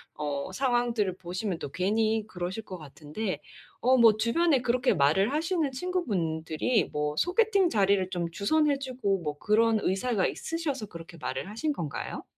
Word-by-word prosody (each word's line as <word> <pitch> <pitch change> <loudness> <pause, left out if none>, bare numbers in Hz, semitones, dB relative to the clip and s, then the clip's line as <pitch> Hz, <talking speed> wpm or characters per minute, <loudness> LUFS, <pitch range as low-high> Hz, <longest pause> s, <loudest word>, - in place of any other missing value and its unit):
어 145 +2 -3
상황들을 240 -6 +1
보시면 185 +1 -3
또 - - -5
괜히 215 +4 +1
그러실 185 +3 -5
것 185 -4 -8
같은데. 155 +7 -5 0.4
어 255 +2 +4
뭐 225 -3 +6
주변에 270 +5 +2
그렇게 250 +1 +2
말을 160 - +3
하시는 320 -2 0
친구분들이 210 - -1
뭐 150 0 -1
소개팅 390 - +3
자리를 195 -3 +2
좀 175 -3 -2
주선해 290 - +2
주고 245 -8 -1
뭐 150 -2 -4
그런 220 +4 +3
의사가 195 +1 +1
있으셔서 290 -10 -3
그렇게 170 -1 -11
말을 130 +7 -3
하신 295 +7 -1
건가요? 150 - -5
215 Hz, 335 characters per minute, -28 LUFS, 175-260 Hz, 0.4 s, 뭐